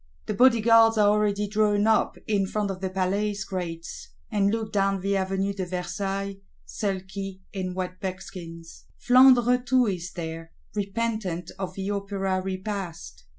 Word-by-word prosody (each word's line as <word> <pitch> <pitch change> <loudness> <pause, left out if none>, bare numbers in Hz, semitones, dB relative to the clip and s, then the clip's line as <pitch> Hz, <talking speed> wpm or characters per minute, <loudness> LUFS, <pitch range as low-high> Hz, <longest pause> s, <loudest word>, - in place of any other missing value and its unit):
The 215 - -2
Bodyguards 230 -1 +5
are 205 -1 +5
already 210 -1 +1
drawn 210 0 +2
up 220 0 +2
in 200 -3 +1
front 205 0 -1
of 185 -1 -7
the 190 - -1
Palace 200 +2 -1
Grates; 170 -4 -6 0.2
and 200 -2 +2
look 220 0 -2
down 195 -1 +1
the 200 +1 0
Avenue 195 +1 0
de 195 -1 -3
Versailles; 195 +2 -3 0.3
sulky, 195 -1 -4
in 185 -2 -3
wet 185 -1 -4
buckskins. 175 -3 -7
Flandre 250 -1 +5
too 255 0 +3
is 180 -4 -3
there, 165 -1 -6 0.2
repentant 200 -4 -2
of 185 -1 -4
the 195 +1 -3
Opera 195 -2 -1
Repast. 190 - -5
195 Hz, 145 wpm, -26 LUFS, 185-210 Hz, 0.3 s, Bodyguards